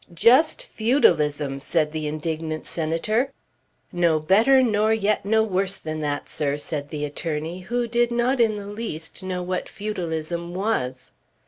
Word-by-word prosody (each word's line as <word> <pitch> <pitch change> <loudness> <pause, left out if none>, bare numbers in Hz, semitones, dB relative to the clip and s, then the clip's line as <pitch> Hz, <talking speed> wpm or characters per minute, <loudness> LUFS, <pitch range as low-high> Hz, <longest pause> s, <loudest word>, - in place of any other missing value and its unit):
"Just 255 - +4
feudalism!" 150 - +2
said 150 +1 0
the 155 -1 -3
indignant 155 +1 -3
Senator. 175 - 0 0.6
"No 170 -3 +2
better, 225 - +5
nor 215 -2 +2
yet 215 -2 +1
no 220 +1 +4
worse 195 -2 0
than 155 -3 -5
that, 145 -1 -2
sir," 145 -1 -1
said 145 -1 -3
the 150 -1 -3
attorney 155 +3 -4
who 240 +6 -2
did 240 +1 +2
not 240 +2 +1
in 225 -2 +3
the 205 - -7
least 205 -6 -6
know 185 -1 -3
what 180 0 -3
feudalism 170 -4 -4
was. 130 - -2
180 Hz, 145 wpm, -24 LUFS, 155-220 Hz, 0.6 s, better